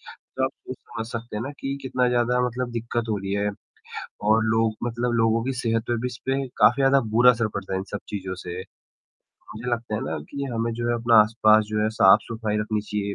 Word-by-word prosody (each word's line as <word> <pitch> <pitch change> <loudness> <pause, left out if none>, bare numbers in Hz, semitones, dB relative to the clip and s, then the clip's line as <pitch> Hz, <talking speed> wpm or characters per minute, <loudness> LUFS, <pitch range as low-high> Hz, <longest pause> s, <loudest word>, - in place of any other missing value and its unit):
तो 130 - -4
आप 130 - 0
ख़ुद 130 - -10
समझ 115 -1 -7
सकते 115 -1 -6
हैं 105 - -2
ना 135 - -4
कि 135 0 -3
कितना 125 -1 +1
ज़्यादा 125 0 +2
मतलब 125 +1 -3
दिक़्क़त 115 0 -3
हो 110 - 0
रही 95 0 -4
है 100 +1 0 0.8
और 110 +1 +4
लोग 110 0 +1
मतलब 120 +1 -1
लोगों 115 0 +2
की 135 - -1
सेहत 115 -1 0
पर 120 - 0
भी 125 - -1
इस 125 -1 -7
पे 135 +1 -1
काफ़ी 140 - +5
ज़्यादा 135 +1 +5 0.2
बुरा 125 +2 +7
असर 115 -2 -1
पड़ता 95 -1 -4
है - - 0
इन - - -4
सब 105 - -3
चीज़ों 95 -2 -4
से। 90 0 -6 1.0
मुझे 115 +3 -5
लगता 115 -2 -2
है 105 - -1
ना 80 +1 -3
कि 140 0 -4
हमें 115 0 -1
जो 120 +1 -2
है 120 - +2
अपना 115 0 +3
आस-पास 110 0 +4
जो 105 0 0
है 110 - +2
साफ़-सफ़ाई 105 +2 +3
रखनी 105 0 -1
चाहिए 105 -1 -3
115 Hz, 230 wpm, -24 LUFS, 105-120 Hz, 1.0 s, बुरा